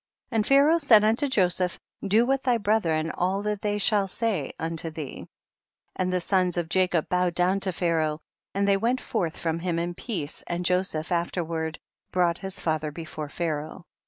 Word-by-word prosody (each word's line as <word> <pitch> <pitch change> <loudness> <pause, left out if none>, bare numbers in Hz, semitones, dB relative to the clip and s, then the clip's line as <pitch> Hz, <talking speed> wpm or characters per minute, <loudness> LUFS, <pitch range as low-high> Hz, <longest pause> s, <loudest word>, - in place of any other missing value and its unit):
24. 230 - -6
And 215 -2 +2
Pharaoh 285 +4 +5
said 230 -9 +6
unto 225 +7 +2
Joseph, 180 -6 +1 0.3
do 210 +4 +4
with 270 +1 +1
thy 250 -3 +2
brethren 170 -7 +1
all 190 +3 -1
that 210 -1 -2
they 205 -1 0
shall 205 -1 +3
say 195 - -1
unto 165 0 -2
thee; 155 -3 -7 0.7
and 185 0 -1
the 180 - +1
sons 180 -1 +1
of 170 -2 -1
Jacob 180 -2 +2
bowed 180 -1 +1
down 180 +2 +2
to 195 -1 +1
Pharaoh, 160 -3 0 0.4
and 200 0 +1
they 200 -1 +4
went 240 +5 +1
forth 175 -11 -2
from 165 0 -1
him 175 -1 -1
in 170 +1 -2
peace, 175 - -4
and 175 +1 -3
Joseph 180 -2 0
afterward 170 -2 -2 0.3
brouglit 175 -2 +2
his 195 0 -5
father 155 -2 -1
before 155 -1 -7
Pharaoh. 160 +2 -4
180 Hz, 180 wpm, -26 LUFS, 165-205 Hz, 0.7 s, said